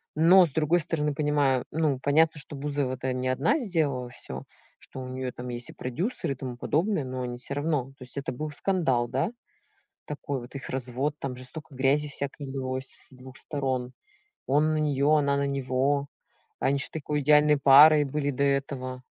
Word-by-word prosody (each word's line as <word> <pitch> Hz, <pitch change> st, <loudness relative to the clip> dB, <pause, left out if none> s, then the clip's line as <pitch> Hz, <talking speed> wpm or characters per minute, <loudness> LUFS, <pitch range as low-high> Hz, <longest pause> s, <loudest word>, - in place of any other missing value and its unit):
но 175 Hz, +4 st, +7 dB
с 155 Hz, -, -5 dB
другой 160 Hz, +4 st, +2 dB
стороны, 150 Hz, -2 st, -1 dB
понимаю. 145 Hz, -3 st, +1 dB
Ну 150 Hz, -4 st, 0 dB
понятно, 155 Hz, +3 st, +3 dB
что 145 Hz, +1 st, -8 dB
Бузова 140 Hz, -2 st, -2 dB
это 130 Hz, 0 st, -3 dB
не 130 Hz, 0 st, -2 dB
одна 135 Hz, -, +2 dB
сделала 150 Hz, -, -1 dB
всё. 120 Hz, -, -8 dB, 0.4 s
Что 130 Hz, -, -9 dB
у 130 Hz, -, -6 dB
неё 130 Hz, 0 st, -4 dB
там 125 Hz, +1 st, -7 dB
есть 120 Hz, 0 st, -5 dB
и -, -, -16 dB
продюсер, 155 Hz, -, -3 dB
и 135 Hz, -, -2 dB
тому 130 Hz, -1 st, -6 dB
подобное. 165 Hz, +5 st, 0 dB
Но 130 Hz, 0 st, -5 dB
они 120 Hz, 0 st, -4 dB
всё 135 Hz, +2 st, -5 dB
равно. 145 Hz, -3 st, 0 dB
То -, -, -10 dB
есть 125 Hz, +2 st, -11 dB
это 140 Hz, -, -3 dB
был 150 Hz, +4 st, -5 dB
скандал, 145 Hz, -8 st, +1 dB
да? 135 Hz, -, -1 dB, 0.8 s
Такой 145 Hz, -2 st, -4 dB
вот, 120 Hz, +3 st, -12 dB
их 140 Hz, -, -6 dB
развод, 130 Hz, +3 st, -2 dB
там 130 Hz, -2 st, -4 dB
же 130 Hz, -, -8 dB
столько 145 Hz, +2 st, -9 dB
грязи 140 Hz, +3 st, +2 dB
всякой 140 Hz, +1 st, -2 dB
лилось 130 Hz, 0 st, -3 dB
с -, -, -5 dB
2 130 Hz, +1 st, -13 dB
сторон. 130 Hz, -4 st, -3 dB, 0.6 s
Он 150 Hz, +3 st, +3 dB
на -, -, 0 dB
неё, 145 Hz, -1 st, +2 dB
она 140 Hz, -2 st, +3 dB
на 140 Hz, 0 st, 0 dB
него. 140 Hz, +1 st, 0 dB, 0.5 s
Они 135 Hz, -, +2 dB
ещё 135 Hz, -, -3 dB
такой 150 Hz, -1 st, -2 dB
идеальной 150 Hz, +1 st, +5 dB
парой 145 Hz, +3 st, +8 dB
были 145 Hz, +1 st, -1 dB
до 140 Hz, +1 st, -1 dB
этого. 135 Hz, -2 st, -1 dB
140 Hz, 190 wpm, -27 LUFS, 130-150 Hz, 0.8 s, парой